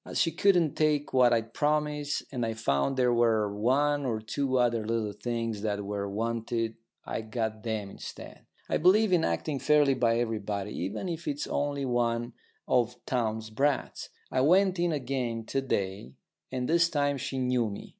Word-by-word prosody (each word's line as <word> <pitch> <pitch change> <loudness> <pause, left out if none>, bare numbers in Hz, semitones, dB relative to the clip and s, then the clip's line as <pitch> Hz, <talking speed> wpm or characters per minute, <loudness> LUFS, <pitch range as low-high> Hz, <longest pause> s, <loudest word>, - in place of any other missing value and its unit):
As - - -6
she 165 - +3
couldn't 175 -3 +3
take 150 -2 +1
what 125 -2 +5
I'd 115 -1 0
promised, 150 -1 0
and 125 -3 -2
I 115 -1 -2
found 110 - 0
there 125 -1 +3
were 110 -3 +2
one 140 +6 +2
or 115 -5 -1
two 130 +4 -1
other 120 -2 +2
little 110 -1 -1
things 115 -3 -3
that 105 -1 -2
were 100 0 -3
wanted, 115 +2 -2 0.3
I - - -3
got 110 -1 -3
them 105 -3 -3
instead. - - -10 0.2
I - - +1
believe 190 +5 +4
in 170 -2 +4
acting 150 -4 -1
fairly 145 +1 +4
by 115 -3 +2
everybody, 105 -3 -2
even 95 - -4
if 170 -1 -5
it's 145 0 -2
only 145 -1 -1
one 120 -1 0 0.3
of 125 -1 +2
Townes' 110 -3 -2
brats. 140 +5 -1 0.2
I 130 - +2
went 185 +5 +4
in 175 0 +2
again 125 -5 -2
to 135 - -1
day, 95 - -3 0.4
and 125 -1 -2
this 170 +1 +4
time 145 -2 +1
she 135 - -4
knew 125 -3 +1
me. 100 - -8
120 Hz, 175 wpm, -29 LUFS, 110-145 Hz, 0.4 s, what